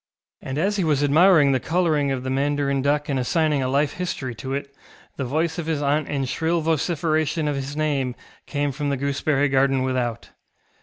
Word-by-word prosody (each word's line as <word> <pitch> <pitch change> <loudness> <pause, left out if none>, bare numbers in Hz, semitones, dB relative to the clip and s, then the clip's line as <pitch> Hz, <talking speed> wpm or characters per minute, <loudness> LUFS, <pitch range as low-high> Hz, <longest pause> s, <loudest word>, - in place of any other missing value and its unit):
And 130 +1 -5
as 200 +6 +1
he 190 - +1
was 150 -3 +1
admiring 155 0 +5
the 130 - +2
colouring 160 -3 +1
of 130 -2 -2
the 130 - -3
mandarin 140 0 0
duck 145 +2 +1
and 135 -2 -1
assigning 150 +2 +1
a 130 - 0
life 140 +2 +1
history 145 -8 -4
to 125 +4 -7
it, 140 0 -4 0.4
the 135 - -3
voice 160 +6 -1
of 165 - -4
his 160 -3 0
aunt 145 +1 0
in 140 -2 -1
shrill 165 +6 0
vociferation 155 -1 0
of 145 - 0
his 140 +2 -5
name 140 -5 0 0.3
came 145 -1 -1
from 145 +2 -3
the 140 - 0
gooseberry 140 +1 0
garden 135 -1 +2
without. 125 -3 -2
145 Hz, 195 wpm, -23 LUFS, 135-155 Hz, 0.4 s, admiring